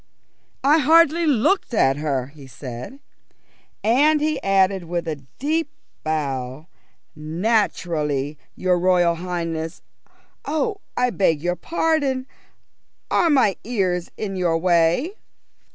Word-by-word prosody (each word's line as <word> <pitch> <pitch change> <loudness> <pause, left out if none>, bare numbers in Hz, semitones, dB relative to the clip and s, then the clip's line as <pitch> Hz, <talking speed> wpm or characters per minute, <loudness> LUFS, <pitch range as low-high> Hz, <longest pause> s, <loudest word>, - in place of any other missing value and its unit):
"I 295 +4 +5
hardly 330 +3 +4
looked 280 - +2
at 135 -9 +3
her," 140 -4 -2
he 145 -3 -13
said. 130 - -9 0.8
And 290 +8 +4
he 305 -1 -1
added 195 -1 +2
with 170 0 -3
a 155 -2 -2 0.2
deep 310 +3 -1 0.3
bow, 140 -3 -3 0.5
"Naturally 155 -4 0 0.3
when - - -14
your 180 -1 +3
Royal 175 -1 +3
Highness 165 -2 -4 0.6
oh, 355 +8 -2 0.2
I 250 0 +2
beg 165 -8 +2
your 175 0 0
pardon, 285 - 0 0.9
are 340 - +3
my 255 -10 +3
ears 185 -7 -1
in 200 -3 -4
your 175 -3 +1
way?" 175 - +2
185 Hz, 115 wpm, -22 LUFS, -, 0.9 s, I